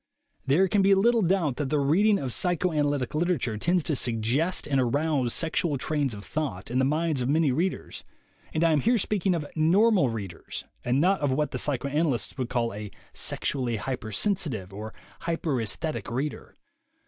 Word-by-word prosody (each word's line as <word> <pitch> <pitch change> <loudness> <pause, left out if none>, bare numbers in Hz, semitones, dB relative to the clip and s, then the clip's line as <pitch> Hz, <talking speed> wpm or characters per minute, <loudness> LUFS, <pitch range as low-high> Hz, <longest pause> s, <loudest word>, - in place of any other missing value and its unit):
There 165 +8 +4
can 200 +2 +2
be 195 0 +5
little 230 +4 +3
doubt 170 -8 +1
that 145 -3 -2
the 150 - +1
reading 185 +10 +3
of 130 -7 -3
psy 180 -1 +1
choanalytic 145 -6 0
literature 155 -8 0
tends 175 +5 +1
to 155 - 0
suggest 125 +9 0
and 135 -3 +2
arouse 140 0 +1
sexual 160 -1 0
trains 140 -3 -1
of 100 -1 -10
thought 110 - -4
in 125 - +1
the 130 - +3
minds 155 0 +1
of 125 - -1
many 155 -1 +3
readers, 175 +8 -2 0.5
and 160 - 0
I 165 - +4
am 155 - +3
here 235 - +3
speaking 195 -3 0
of 155 -3 -3
"normal" 180 - +4
readers, 100 -7 -6 0.2
and 125 +2 +1
not 185 +4 +2
of 145 -2 +1
what 150 +3 0
the - - -2
psychoanalysts 140 0 -1
would 125 -2 -2
call 120 -3 -1
a 105 0 -6 0.2
"sexually 125 -4 -1
hypersensitive" 110 - -2
or 110 +2 -6 0.3
"hyperassthetic" 155 -3 -2
reader. 135 +5 -4
145 Hz, 170 wpm, -27 LUFS, 125-170 Hz, 0.5 s, be